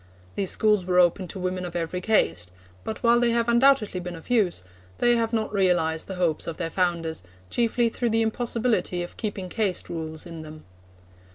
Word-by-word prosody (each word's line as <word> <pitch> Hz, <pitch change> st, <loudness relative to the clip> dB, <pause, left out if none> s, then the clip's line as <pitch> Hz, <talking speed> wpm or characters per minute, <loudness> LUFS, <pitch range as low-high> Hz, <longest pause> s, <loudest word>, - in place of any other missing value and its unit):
These 195 Hz, -2 st, -1 dB
schools 210 Hz, -3 st, +3 dB
were 180 Hz, 0 st, 0 dB
open 180 Hz, +1 st, +3 dB
to 190 Hz, -, -6 dB
women 185 Hz, 0 st, -2 dB
of 175 Hz, -1 st, -6 dB
every 170 Hz, +1 st, -2 dB
caste; 90 Hz, -, +1 dB, 0.3 s
but 220 Hz, -, -6 dB
while 235 Hz, 0 st, +5 dB
they 240 Hz, 0 st, +3 dB
have 235 Hz, 0 st, +1 dB
undoubtedly 235 Hz, -5 st, +3 dB
been 180 Hz, 0 st, -6 dB
of 165 Hz, +9 st, -11 dB
use, 195 Hz, -, +2 dB, 0.3 s
they 240 Hz, 0 st, +4 dB
have 230 Hz, -1 st, 0 dB
not 220 Hz, -2 st, -1 dB
realised 175 Hz, -5 st, +1 dB
the 190 Hz, -, -5 dB
hopes 175 Hz, -4 st, 0 dB
of 165 Hz, -, -4 dB
their 165 Hz, -2 st, -3 dB
founders, 170 Hz, -, 0 dB, 0.3 s
chiefly 235 Hz, 0 st, +2 dB
through 235 Hz, +1 st, -1 dB
the 225 Hz, 0 st, +2 dB
impossibility 225 Hz, -5 st, 0 dB
of 175 Hz, -, -9 dB
keeping 200 Hz, -4 st, -4 dB
caste 195 Hz, -1 st, -1 dB
rules 160 Hz, -1 st, -5 dB
in 165 Hz, -2 st, -8 dB
them. 155 Hz, 0 st, -11 dB
185 Hz, 190 wpm, -25 LUFS, 170-225 Hz, 0.3 s, while